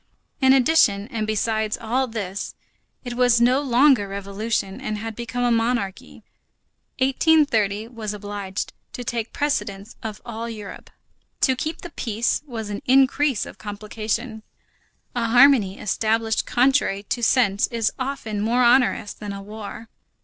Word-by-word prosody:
In 265 0 +6
addition, 255 -7 +4
and 220 -5 -3
beside 220 0 0
all 245 +4 -1
this, 200 -4 -5 0.5
as 245 - -4
it - - -3
was 245 -1 +4
no 250 +3 +4
longer 255 -4 +4
revolution 200 +1 -3
and 215 0 -3
had 225 +1 -6
become 240 +1 -3
a 245 - +2
monarchy, 230 -4 -1 0.7
1830 260 -7 +2
was 225 -4 -5
obliged 205 -2 -5 0.2
to 245 - -5
take 230 -1 -3
precedence 210 -8 -2
of 215 -1 -6
all 230 0 -5
Europe. 215 -3 -9 0.5
To 260 - +3
keep 310 +5 -4
the 350 - -8
peace, 230 -3 -1
was 225 -5 -5
an 205 - -4
increase 270 0 +3
of - - -11
complication. 215 +2 -4 0.7
A 235 -2 -1
harmony 240 -5 +5
established 220 +2 0
contrary 245 -6 +2
to 240 +4 -3
sense 220 -4 +3
is 230 -2 0
often 255 -6 -3
more 240 +4 +2
onerous 240 -4 +3
than 205 -1 -7
a 200 - -7
war. 215 +2 -8
225 Hz, 140 wpm, -23 LUFS, 210-250 Hz, 0.7 s, In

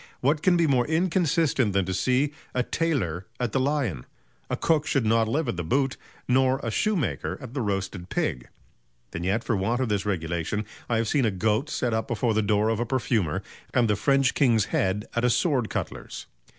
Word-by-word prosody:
What 145 +4 +1
can 180 0 +4
be 170 - +3
more 130 -5 +2
inconsistent 160 - +1
than 100 -1 +2
to 95 - -2
see... 130 +9 +1 0.2
a 125 - +2
tailor 120 - -1
at 120 -3 -1
the 135 - +1
Lion? 130 - -1 0.4
A - - -1
cook 155 -3 +1
should 135 -5 +1
not 115 0 +3
live 145 +6 0
at 115 - -2
the 85 - -2
Boot, 135 - +1 0.3
nor 130 +1 +3
a 115 - -2
Shoe 215 - +1
maker 155 -10 -2
at 130 -3 -9
the 135 - -2
Roasted 95 -3 -3
Pig; 60 -1 -2 0.6
and 85 - -4
yet 100 +6 0
for 115 - 0
want 110 +6 0
of 130 -3 0
this 100 -2 0
regulation, 85 +1 -2 0.2
I 115 - +2
have 115 0 0
seen 135 +2 +2
a - - +3
Goat 110 +8 0
set 120 -5 -1
up 110 0 -1
before 120 0 0
the 110 - +2
door 105 +1 +2
of 115 -1 0
a 120 - 0
perfumer, 115 - 0 0.3
and 120 -2 +4
the 105 - +2
French 135 +4 +2
King's 115 -7 +3
Head 95 +3 +1
at 120 - 0
a 125 - +4
sword 130 -3 +1
cutler's." - - -5
115 Hz, 210 wpm, -26 LUFS, 105-135 Hz, 0.6 s, can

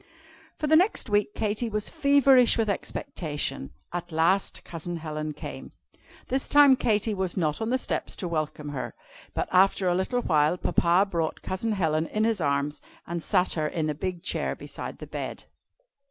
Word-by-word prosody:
For 305 - -2
the 310 +1 +4
next 350 - +2
week 205 0 +1
Katy 215 +2 -1
was 210 -1 0
feverish 280 -5 +5
with 220 -3 +2
expectation. 150 - -3 0.2
At 175 0 -4
last 165 +5 +1
Cousin 170 +1 -6
Helen 155 -1 -4
came. - - -8 0.5
This 265 +1 -1
time 290 -2 +7
Katy 215 -3 +1
was 190 -2 -1
not 155 +1 0
on 220 - -1
the 255 - +2
steps - - -3
to 185 - -4
welcome 155 -2 -3
her, 140 -3 -5 0.4
but - - -1
after 190 0 +4
a 175 - +3
little 235 +7 0
while 150 +3 +2
Papa 175 +3 +2
brought 165 -4 -2
Cousin 215 +4 -2
Helen 160 -4 0
in 215 - -1
his 225 -4 +1
arms, 140 0 0 0.2
and 170 0 -4
sat 180 +2 +2
her 155 -2 0
in 155 0 -1
a - - -2
big 175 +3 -4
chair - - -1
beside - - -7
the - - -8
bed. - - -6
185 Hz, 175 wpm, -27 LUFS, 160-220 Hz, 0.5 s, time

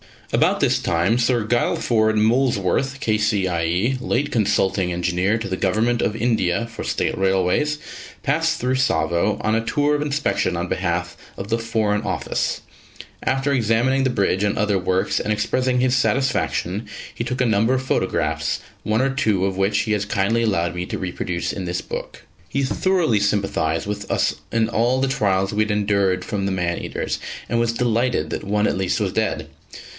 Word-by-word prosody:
About - - +3
this - - +3
time 90 +8 +1
Sir 120 -1 +2
Guilford 110 -1 +1
Molesworth, 125 +3 +1
K.C.I.E., 100 0 +1
late 135 +3 -1
Consulting 95 -4 +1
Engineer 90 +4 0
to 110 -2 -5
the 95 - -2
Government 110 +6 +1
of 105 - 0
India 115 -3 0
for 115 - -6
State - - -1
Railways, 95 +11 +1 0.5
passed 155 +3 +1
through 125 +1 0
Tsavo 105 -6 +1
on 110 - +1
a 115 - 0
tour 145 +5 +1
of 145 - 0
inspection 150 0 0
on - - -2
behalf - - -2 0.2
of 100 - -6
the 115 0 +1
Foreign 110 -3 0
Office. 100 -3 -2 0.6
After 135 +2 0
examining 125 +2 +2
the - - +3
bridge 100 -5 +1
and 105 0 0
other 105 -2 +1
works 95 +1 0
and 105 - 0
expressing 125 +3 0
his 130 0 +2
satisfaction, 125 -6 0 0.3
he 115 - -4
took 125 +1 -2
a - - +3
number 110 +2 +2
of 130 0 0
photographs, 130 - 0 0.2
one 110 +2 +1
or 135 +1 +1
two 110 -9 +1
of 95 -1 -2
which 100 +1 +2
he 110 - -1
has 105 -1 0
kindly 105 +3 +1
allowed 90 -6 0
me 90 0 -3
to - - -3
reproduce 90 -1 -3
in 95 - -4
this 90 0 -2
book. - - -7 0.3
He 140 - 0
thoroughly 160 - +1
sympathised 100 -6 0
with 105 0 -5
us - - +1 0.2
in 115 -1 +1
all 120 +3 +1
the 135 - +1
trials 100 -6 +1
we 105 +1 +2
had 110 - -2
endured 100 -2 +1
from 100 -3 -2
the - - -1
man 85 -2 -1
eaters, - - -3 0.3
and 120 - +1
was 115 0 +1
delighted 120 -8 0
that - - -4
one 105 +1 +1
at - - 0
least 95 -1 0
was - - 0
dead. - - -1
110 Hz, 180 wpm, -22 LUFS, 95-125 Hz, 0.6 s, About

